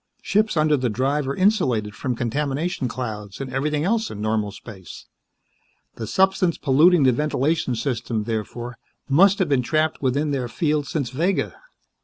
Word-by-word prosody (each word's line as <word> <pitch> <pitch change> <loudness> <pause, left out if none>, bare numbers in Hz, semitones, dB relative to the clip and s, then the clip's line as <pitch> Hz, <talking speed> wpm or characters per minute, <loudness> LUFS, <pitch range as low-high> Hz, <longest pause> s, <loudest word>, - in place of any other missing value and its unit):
Ships 215 -3 +1
under 155 0 +4
the 125 -2 0
Drive 135 +5 0
are 140 - -2
insulated 130 - +1
from 125 +2 -3
contamination 140 +5 -2
clouds 105 -5 -6
and 135 -2 -6
everything 150 +2 0
else 225 +4 0
in 105 - -8
normal 110 -1 -1
space. 95 -5 -11 0.9
The 110 - -6
substance 190 - +2
polluting 155 +4 +4
the 130 - +5
ventilation 150 0 0
system, 115 -3 -2
therefore, 115 +2 -5 0.3
must 185 +8 +5
have 190 - +1
been 135 -3 +3
trapped 155 +5 0
within 145 +3 0
their 130 -3 -1
field 150 +2 -1
since 140 -7 -2
Vega. 170 +8 0
135 Hz, 155 wpm, -23 LUFS, 120-155 Hz, 0.9 s, the